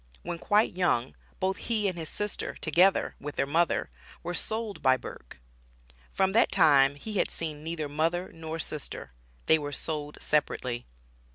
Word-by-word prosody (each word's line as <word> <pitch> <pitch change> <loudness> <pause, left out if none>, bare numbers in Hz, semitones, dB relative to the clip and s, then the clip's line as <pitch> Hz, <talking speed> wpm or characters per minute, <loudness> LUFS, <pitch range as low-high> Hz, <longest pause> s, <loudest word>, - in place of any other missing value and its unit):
When 170 - -4
quite 210 +5 +3
young, 155 -9 +1 0.2
both 190 +1 0
he 215 -3 0
and 185 - -1
his 160 -2 -5
sister, 210 0 -2
together 180 +5 +3
with 145 +1 -6
their 135 - +1
mother, 165 +5 +1 0.3
were 175 +1 -3
sold 220 +2 -2
by 130 -1 +4
Burke. - - -10 0.7
From 190 0 +2
that 230 +4 +4
time 140 -2 +5
he 210 +7 -4
had - - +2
seen 155 -2 -4
neither 160 -2 -3
mother 165 +5 -1
nor 160 0 -6
sister 150 - -3 0.3
they 160 - +5
were 145 -1 -4
sold 150 0 -3
separately. 130 -5 -1
160 Hz, 160 wpm, -28 LUFS, 145-185 Hz, 0.7 s, time